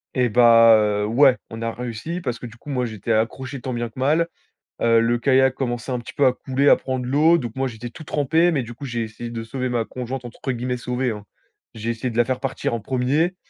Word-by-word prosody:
Et 125 -2 +2
bah, 115 -1 +7 0.3
heu, - - 0
ouais, 130 +3 +5
on 115 0 -8
a 115 - -1
réussi 125 +9 -5
parce 125 -5 -3
que - - -9
du 120 0 -11
coup, 145 - -12
moi, 125 -3 0
j'étais 110 0 -4
accroché 125 +4 -2
tant 130 -2 -4
bien 120 0 -3
que 110 - -13
mal. 155 +5 +2 0.5
Heu, 115 -1 +4
le 120 +1 +1
kayak 130 +1 +3
commençait 120 -1 -3
un 125 - -1
petit 120 - -10
peu 145 - +2
à 130 - +4
couler, 135 +2 -1
à - - +8
prendre 130 -1 -4
l'eau. 155 +6 +4
Donc 120 -6 -5
moi, 135 0 0
j'étais 120 0 -7
tout 155 - -11
trempé, 160 +4 +2
mais 140 -6 0
du 120 +1 -9
coup, 140 +4 -9
j'ai 120 -2 -2
essayé 110 +2 -7
de 115 -1 -5
sauver 125 +3 -3
ma 120 -2 -1
conjointe, 125 0 -6
entre 120 +3 -5
guillemets 125 +1 -2
sauver, 125 0 -2
hein. 105 -1 -8 0.5
J'ai 110 +1 -4
essayé 115 +2 -3
de 115 - -6
la 120 - +5
faire 130 +1 -2
partir 135 -3 -2
en 115 - -1
1er, 135 - 0
125 Hz, 250 wpm, -22 LUFS, 115-135 Hz, 0.5 s, à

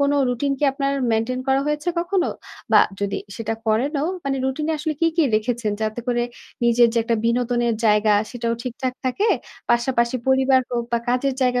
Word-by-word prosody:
কোন 280 0 +3 0.2
রুটিন 275 +3 0
কি - - +1
আপনার 275 0 -1 0.2
মেইনটেইন 230 +3 0
করা 265 0 +3
হয়েছে 300 +2 -1
কখনো? 355 +1 0 0.4
বা - - +8 0.2
যদি 200 -1 -1 0.2
সেটা 225 0 -2
করেন 225 +7 +1
ও, - - +1 0.2
মানে 275 -1 0
রুটিন 265 +3 -1
এ - - +1
আসলে 310 +1 -2
কি, 330 - +4
কি 335 - +4
রেখেছেন? 220 0 0
যাতে 215 +2 -2
করে 240 -1 +1 0.4
নিজের 235 0 +5
যে - - +3
একটা 230 0 +1
বিনোদনের 240 0 +1
জায়গা 210 0 +4 0.2
সেটাও 235 -1 -2
ঠিকঠাক 255 +1 -3
থাকে। 390 - +1 0.4
পাশাপাশি 240 0 +2
পরিবার 265 0 +4
হোক 235 -1 -1
বা 235 - +3
কাজের 255 +2 +1
জায়গা 250 -1 +2
245 Hz, 185 wpm, -22 LUFS, 235-275 Hz, 0.4 s, বা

